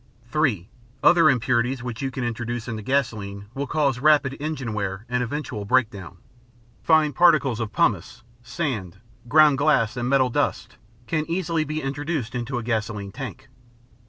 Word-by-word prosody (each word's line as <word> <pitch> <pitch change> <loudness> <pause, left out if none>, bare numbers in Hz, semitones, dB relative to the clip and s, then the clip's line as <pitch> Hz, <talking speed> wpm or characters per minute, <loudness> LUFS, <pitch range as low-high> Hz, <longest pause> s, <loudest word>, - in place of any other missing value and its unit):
(3) 130 - +1 0.4
Other 165 -3 +6
impurities 125 0 +1
which 120 -2 -5
you 135 - -1
can 130 -1 -5
introduce 120 0 -4
into 110 -2 -4
gasoline 105 -6 -2
will 140 0 -3
cause 140 -5 0
rapid 145 -1 +3
engine 140 -6 -4
wear 100 0 -3
and 125 +1 -1
eventual 125 -4 -4
breakdown. 100 -6 0 0.6
Fine 155 -2 +3
particles 135 -6 +4
of 110 -2 -3
pumice, 120 - 0 0.2
sand, 120 - -4 0.3
ground 150 -2 +5
glass, 135 -6 +2
and 120 0 -2
metal 130 -2 +3
dust - - -2 0.3
can 155 +5 -2
easily 165 -2 0
be 155 0 -4
introduced 140 -2 -3
into 125 +1 -3
a 120 - -3
gasoline 110 -3 -3
tank. - - -8
125 Hz, 150 wpm, -24 LUFS, 115-145 Hz, 0.6 s, Other